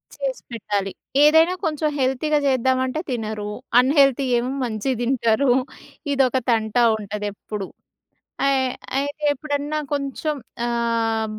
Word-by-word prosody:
చేసిపెట్టాలి. 215 - -3 0.3
ఏదైనా 320 +4 +6
కొంచెం 310 -1 0
హెల్తీగా 265 +4 +1
చేద్దామంటే 260 +1 +1
తినరు. 215 -3 -3 0.3
అన్‌హెల్తీ 275 0 +4
ఏమో 245 +2 -1
మంచిగా 235 +2 -2
తింటారు. 245 +1 +2 0.6
ఇదొక 265 -2 +2
తంట 220 -2 +1 0.2
ఉంటది 210 0 -5
ఎప్పుడు. 200 -1 -6 0.8
అయ్ 265 -1 +2 0.3
అయితే 285 +2 -3
ఎప్పుడన్నా 290 +1 -3
కొంచెం. 285 +2 -2 0.3
ఆహ్, 230 -2 0
260 Hz, 100 wpm, -22 LUFS, 225-285 Hz, 0.8 s, ఏదైనా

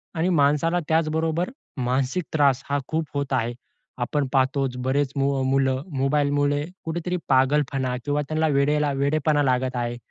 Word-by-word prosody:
आणि 165 +3 +1
माणसाला 160 +2 +2
त्याचबरोबर 160 +2 +1 0.3
मानसिक 130 +6 0
त्रास 140 -4 +3
हा 145 - +1
खूप 160 0 -1
होत 140 -1 -2
आहे. 120 -2 0 0.5
आपण 140 +3 -1
पाहतोच, 135 -1 +1
बरेच 130 +2 0
मुलं 135 -1 +1 0.2
मोबाईलमुळे 145 +1 +1 0.2
कुठेतरी 170 +2 -2
पागलपणा 135 -1 +2
किंवा 145 0 0
त्यांना 155 0 +1
वेडेला 145 +1 +2
वेडेपणा 145 +2 +1
लागत 130 -1 0
आहे. 120 0 -2
140 Hz, 130 wpm, -24 LUFS, 130-155 Hz, 0.5 s, त्रास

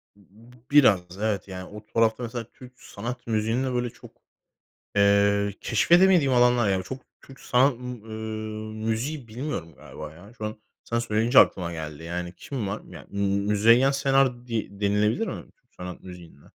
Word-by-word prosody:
B 100 - -23 0.3
b - - -18 0.2
biraz, 125 -11 +6 0.2
evet. 105 -4 -1
Yani 95 -1 -7
o 105 +1 -11
tarafta 115 +1 +1
mesela 120 0 -4
Türk 125 -1 -14
sanat 120 +5 -7
müziğinde 115 +4 0
böyle 120 -1 -1
çok, - - -15 0.8
eee, 100 0 +3
keşfedemediğim 170 - +4
alanlar 120 -3 +4
yani 95 -1 +1
b - - -5
çok 130 +6 -7 0.2
Türk 135 -1 -15
sanat, 130 +3 +3
ımm, 125 -2 -8
ııı, 110 -1 -6 0.2
müziği 125 +4 -2
bilmiyorum 110 - -5
galiba 75 +3 -10
ya. 100 +7 -15
Şu 110 - -4
an 110 +1 -5 0.3
sana 115 0 -1
söyleyince 115 +2 +4
aklıma 85 -2 +3
geldi 80 -1 -7
yani 85 +1 -4
kim 125 -8 -4
var? 100 - -4
Ya, - - -11
ımm, 100 - -3 0.3
Müzeyyen 115 +6 +5
Senar 135 -3 +1
di 115 -5 -2
denilebilir 105 +2 +1
mi - - -5 0.2
Türk - - -44
sanat 90 0 -7
müziğinde? 90 -5 -12
110 Hz, 165 wpm, -25 LUFS, 100-125 Hz, 0.8 s, biraz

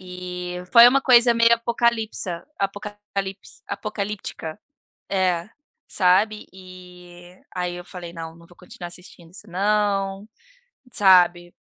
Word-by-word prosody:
eh, 180 -1 -7
foi 235 0 +10
uma 275 +2 +3
coisa 240 -2 +6
meio 230 0 +5
apocalipsa 230 -6 -1
apocalipse 200 0 -5
apocalíptica 200 -4 -5 0.5
È, 185 -2 0 0.4
sabe? 200 +3 +2
Eh, 180 -1 -14
aí, 180 -1 -3
eu 175 - -9
falei: 175 -3 -9
"Não, 165 -1 -8
não 170 0 -17
vou 175 - -20
continuar 175 -1 -10
assistindo 175 -1 -11
isso 210 - -12
não", 200 +1 0 0.7
sabe? 175 -3 +4
190 Hz, 115 wpm, -23 LUFS, 180-210 Hz, 0.7 s, foi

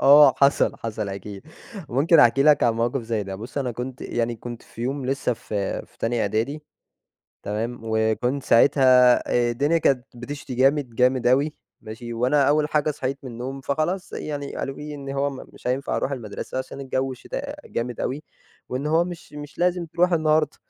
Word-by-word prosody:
آه، 145 +1 +9
وحصل، 140 - +4
حصل 105 -2 -3
أكيد، 100 0 -7 0.5
ممكن 150 +7 +4
أحكي 135 +2 +5
لك 150 -1 +5
عن 120 - +4
موقف 120 +3 -1
زي 115 -2 -2
ده 95 -1 -6
بُصّ 115 +8 -6
أنا 130 -3 -1
كنت 125 +2 -6
يعني 120 0 -2
كنت 120 +1 -8
في 115 - -10
يوم 135 +1 -2
لسه 135 -1 0
في 105 -3 -3
في - - -29
تانية 115 0 0
إعدادي 115 +9 -1 0.8
تمام، 115 +4 -3
وكنت 110 +5 0
ساعتها 125 0 +6
آآ، 120 -1 +2
الدنيا 145 +7 +2
كانت 130 -5 +2
بتشتي 125 +1 -7
جامد، 135 -1 +2
جامد 125 +1 +2
أوي 140 +5 +3 0.3
ماشي، 115 +1 -8
وأنا 125 +5 +2
أول 150 +1 +2
حاجة 150 0 +1
صحيت 135 -1 -3
من 130 - -7
النوم 130 +4 -6
فخلاص 155 +7 -2
يعني 145 -2 -5
قالوا 135 - -4
لي 150 0 -7
إن 140 -1 -8
هو 140 +1 0
ما 135 - -8
مش - - -13
هينفع 130 +2 -1
أرُوح 140 - -1
المدرسة 120 0 -5
عشان 130 +1 -6
الجو 135 0 -2
شتا - - -6
جامد 120 +1 -3
أوي 140 +4 -2 0.5
وإن 130 +3 -3
هو 160 +3 +3
مش 175 -2 -9
مش 145 0 -9
لازم 180 -1 +1
تروح 175 +3 +1
النهارده، 155 -2 +2
130 Hz, 185 wpm, -24 LUFS, 120-145 Hz, 0.8 s, آه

